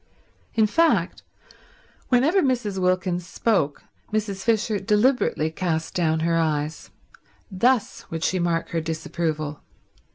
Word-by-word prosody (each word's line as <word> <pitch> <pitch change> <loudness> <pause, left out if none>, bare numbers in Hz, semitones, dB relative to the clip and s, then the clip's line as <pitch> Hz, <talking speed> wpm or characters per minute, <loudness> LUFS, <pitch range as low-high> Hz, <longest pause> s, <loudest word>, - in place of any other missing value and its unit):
In 220 -2 +4
fact, 330 +10 +2 0.9
whenever 285 +10 +4
Mrs. 240 - 0
Wilkins 180 -1 0
spoke 190 -13 0 0.3
Mrs. 210 -2 -2
Fisher 220 -2 +1
deliberately 210 - +2
cast 160 -1 -2
down 160 -2 +1
her 165 0 +1
eyes. 155 -1 -2 0.6
Thus 235 +4 +1
would 165 0 -4
she 185 - +1
mark 170 -1 0
her 165 - -1
disapproval. 155 -1 -3
185 Hz, 110 wpm, -24 LUFS, 160-220 Hz, 0.9 s, In